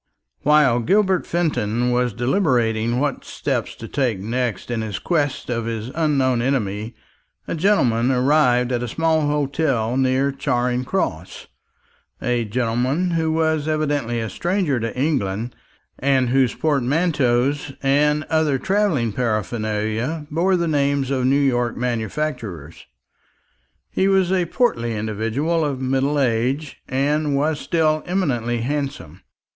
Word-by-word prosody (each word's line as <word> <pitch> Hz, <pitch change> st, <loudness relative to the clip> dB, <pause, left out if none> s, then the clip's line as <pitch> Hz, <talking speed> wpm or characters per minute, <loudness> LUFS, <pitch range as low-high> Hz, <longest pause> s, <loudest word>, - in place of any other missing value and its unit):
While 145 Hz, -5 st, +4 dB
Gilbert 190 Hz, -, +2 dB
Fenton 125 Hz, -8 st, 0 dB
was 125 Hz, 0 st, +1 dB
deliberating 120 Hz, -, +1 dB
what 145 Hz, -1 st, -1 dB
steps -, -, -3 dB
to -, -, -9 dB
take 130 Hz, -7 st, 0 dB
next 115 Hz, +2 st, -3 dB
in 115 Hz, -2 st, -1 dB
his 110 Hz, -3 st, -4 dB
quest 145 Hz, -6 st, -1 dB
of 115 Hz, -1 st, -2 dB
his 115 Hz, 0 st, -4 dB
unknown 135 Hz, -6 st, +1 dB
enemy, 110 Hz, -4 st, -2 dB, 0.5 s
a -, -, -2 dB
gentleman 135 Hz, -, +2 dB
arrived 125 Hz, -2 st, +3 dB
at 120 Hz, -1 st, 0 dB
a 125 Hz, -, -3 dB
small 160 Hz, +3 st, +1 dB
hotel 140 Hz, -5 st, 0 dB
near 130 Hz, +1 st, +2 dB
Charing 125 Hz, -2 st, -1 dB
Cross 90 Hz, -, -3 dB, 0.7 s
a 120 Hz, -1 st, 0 dB
gentleman 125 Hz, -, 0 dB
who 160 Hz, -1 st, 0 dB
was 160 Hz, -1 st, +1 dB
evidently 145 Hz, -6 st, 0 dB
a 115 Hz, -, -2 dB
stranger 175 Hz, -7 st, 0 dB
to 115 Hz, +2 st, -4 dB
England, 120 Hz, -6 st, -1 dB, 0.4 s
and 130 Hz, -2 st, +2 dB
whose 130 Hz, -1 st, +2 dB
portmanteaus 145 Hz, -2 st, +1 dB
and 150 Hz, +2 st, +2 dB
other 155 Hz, -3 st, +1 dB
travelling 190 Hz, -, +1 dB
paraphernalia 110 Hz, -, -2 dB
bore 180 Hz, +5 st, +2 dB
the 170 Hz, -1 st, 0 dB
names 140 Hz, -3 st, +1 dB
of 130 Hz, -2 st, 0 dB
New 135 Hz, -, +3 dB
York 120 Hz, -4 st, +1 dB
manufacturers. 115 Hz, -, -4 dB, 1.0 s
He 190 Hz, -, +1 dB
was 190 Hz, -2 st, +3 dB
a 185 Hz, -2 st, +2 dB
portly 120 Hz, -, 0 dB
individual 115 Hz, +10 st, -1 dB
of 140 Hz, -3 st, -2 dB
middle 135 Hz, +3 st, 0 dB
age, 130 Hz, +4 st, -1 dB
and 145 Hz, +2 st, +1 dB
was 150 Hz, +1 st, 0 dB
still 155 Hz, -2 st, +1 dB
eminently 120 Hz, -11 st, -1 dB
handsome. 120 Hz, -, -4 dB
135 Hz, 130 wpm, -21 LUFS, 120-155 Hz, 1.0 s, While